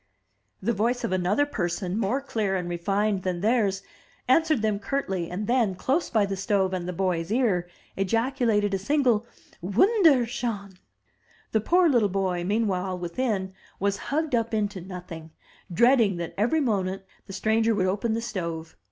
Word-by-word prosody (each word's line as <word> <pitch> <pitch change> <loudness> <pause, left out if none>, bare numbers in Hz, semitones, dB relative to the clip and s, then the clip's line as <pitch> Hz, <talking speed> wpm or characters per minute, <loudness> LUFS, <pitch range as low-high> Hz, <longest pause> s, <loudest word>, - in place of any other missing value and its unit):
The 235 - +1
voice 235 +4 0
of - - -1
another 185 +9 +2
person, 185 -6 -2
more 225 +5 0
clear 215 -7 -1
and 180 -2 -2
refined 195 +3 0
than 180 -2 -2
theirs, 205 -3 +1 0.4
answered 310 -2 +3
them 210 -2 +1
curtly, 195 -8 -2
and 190 +4 -4
then, 235 -5 +1
close 275 - 0
by 215 -3 +2
the 195 0 -3
stove 190 0 0
and 180 -1 -3
the - - -2
boy's 180 -1 -1
ear, 205 -8 +1 0.3
ejaculated 225 0 +1
a 195 - 0
single 240 -1 +1 0.3
''Wunderschonr 240 - +2 0.8
The 220 - +2
poor 355 - +4
little 240 -9 +3
boy, 185 -2 -1
meanwhile, 190 -2 0
within, 190 +2 -2 0.3
was 200 0 0
hugged 310 0 -1
up 230 -1 +1
into 205 -3 -2
nothing, 175 -3 -8 0.4
dreading 230 -1 +4
that 170 -1 -5
every 245 +10 +1
moment 195 -6 -1 0.2
the 195 - -8
stranger 220 +3 +1
would 190 -2 +1
open 210 +4 0
the 230 - -2
stove. 170 -7 -5
205 Hz, 155 wpm, -26 LUFS, 185-235 Hz, 0.8 s, poor